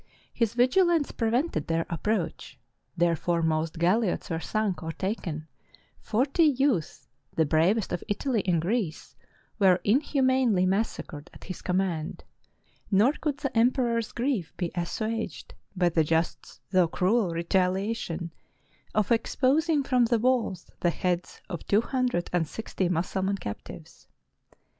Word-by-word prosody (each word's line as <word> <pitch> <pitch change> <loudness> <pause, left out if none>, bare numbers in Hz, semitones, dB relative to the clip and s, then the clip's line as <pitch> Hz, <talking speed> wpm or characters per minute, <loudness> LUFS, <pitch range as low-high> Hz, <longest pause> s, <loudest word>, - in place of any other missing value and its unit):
His 230 -1 0
vigilance 320 +5 +3
pre 225 - -1
vented 245 - 0
their 165 0 0
approach; 175 0 -2 0.4
their 170 0 +3
foremost 160 -1 0
galiots 185 +3 +1
were 165 - -1
sunk 205 -2 -1
or 160 - -4
taken; 165 -5 -4 0.5
forty 265 +9 0
youths, 265 - +1 0.3
the 160 - +3
bravest 175 +8 +2
of 175 - -3
Italy 225 +2 0
and 175 -2 +3
Greece, 180 -1 -2 0.4
were 190 -3 +5
inhumanly 260 -4 +2
massacred 185 -6 -2
at - - -13
his 185 - -7
command; 180 -4 -1 0.7
nor 210 +6 +5
could 300 -2 -2
the 275 -3 -4
emperor's 235 -1 +2
grief 235 - -2
be 175 -3 -2
assuaged 215 +6 -3 0.2
by 180 -1 +3
the 165 -1 +2
just 165 +2 -2
though 185 -3 +4
cruel 190 +4 +1
retaliation, 180 0 -1 0.6
of 215 -1 +1
exposing 280 +6 +2
from 255 -3 +3
the 235 0 +2
walls 225 -6 0
the 175 - +2
heads 175 +2 -2
of 175 -5 -6
two 205 +2 +4
hundred 250 -8 -1
and 170 -3 +1
sixty 190 -1 -3
Mussulman 190 +3 -1
captives. 105 - -9
195 Hz, 130 wpm, -27 LUFS, 170-240 Hz, 0.7 s, were